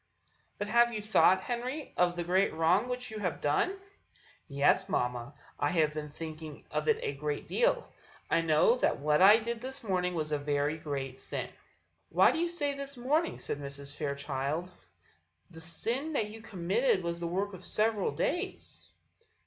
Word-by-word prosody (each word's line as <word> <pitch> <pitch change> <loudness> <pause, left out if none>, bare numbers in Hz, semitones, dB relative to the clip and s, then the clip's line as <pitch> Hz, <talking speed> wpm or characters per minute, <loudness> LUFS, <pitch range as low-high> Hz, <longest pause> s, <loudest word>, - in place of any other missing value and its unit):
"But 205 - -3
have 235 +2 +4
you 220 - -3
thought, 205 -3 +4
Henry, 250 +7 -4
of 175 0 +2
the 175 - -2
great 185 +1 +2
wrong 175 +9 +3
which 250 -1 -4
you 215 - -5
have 180 -6 -2
done?" 255 - +1 0.7
"Yes, 140 -2 +2
mamma, 125 +2 -1 0.2
I 145 - +2
have 155 -3 +2
been 150 -1 -5
thinking 155 -1 -8
of - - -2
it 450 -1 +4
a 440 - -1
great 445 - -3
deal; - - +2 0.4
I 165 - +2
know 165 +9 +4
that - - +1
what 150 +3 +2
I 205 +3 +9
did 230 0 -4
this 260 0 -6
morning 180 -3 0
was 155 -2 -2
a 150 - +1
very 145 +2 0
great 135 -3 -4
sin." - - -4 0.6
"Why - - +5
do - - -2
you 345 - +1
say 295 -5 -1
this 280 -1 -6
morning?" 300 +7 +1
said 145 - -4
Mrs. 140 0 -6
Fairchild; 140 +3 -3 0.8
"the 160 - -11
sin 235 - -3
that 215 -7 0
you 225 +1 -10
committed 190 +2 +1
was 170 0 -2
the 170 - -3
work 195 +4 -2
of 185 -1 -9
several 215 0 +1
days." 390 -6 -3
180 Hz, 175 wpm, -31 LUFS, 150-240 Hz, 0.8 s, I